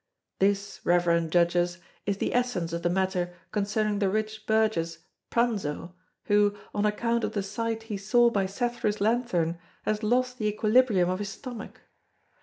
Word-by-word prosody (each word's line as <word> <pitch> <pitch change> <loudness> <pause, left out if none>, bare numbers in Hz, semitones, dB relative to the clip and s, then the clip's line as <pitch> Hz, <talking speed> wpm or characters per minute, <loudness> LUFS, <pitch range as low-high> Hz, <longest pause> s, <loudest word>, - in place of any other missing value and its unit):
This, 200 0 +1
reverend 170 -2 +2
Judges, 175 0 +2 0.3
is 200 -1 0
the - - -1
essence 225 -10 0
of 170 - -2
the 175 - +1
matter 180 -1 0 0.2
concerning 210 0 0
the 200 -2 +2
rich 215 +1 -3
burgess, 215 -7 +1 0.3
Pranzo, 200 -8 -1 0.3
who, 205 0 +3 0.2
on 210 0 +1
account 230 +2 0
of - - -1
the 205 -3 -1
sight 225 +3 -3
he 220 -2 -4
saw 235 +4 +4
by 195 -3 +1
Cethru's 215 0 -1
lanthorn, 200 -7 +1 0.2
has 215 0 -1
lost 250 +3 +1
the 215 - 0
equilibrium 215 -2 +3
of 185 +1 -1
his 205 -1 -3
stomach. 240 +1 -8
205 Hz, 155 wpm, -27 LUFS, 180-225 Hz, 0.3 s, saw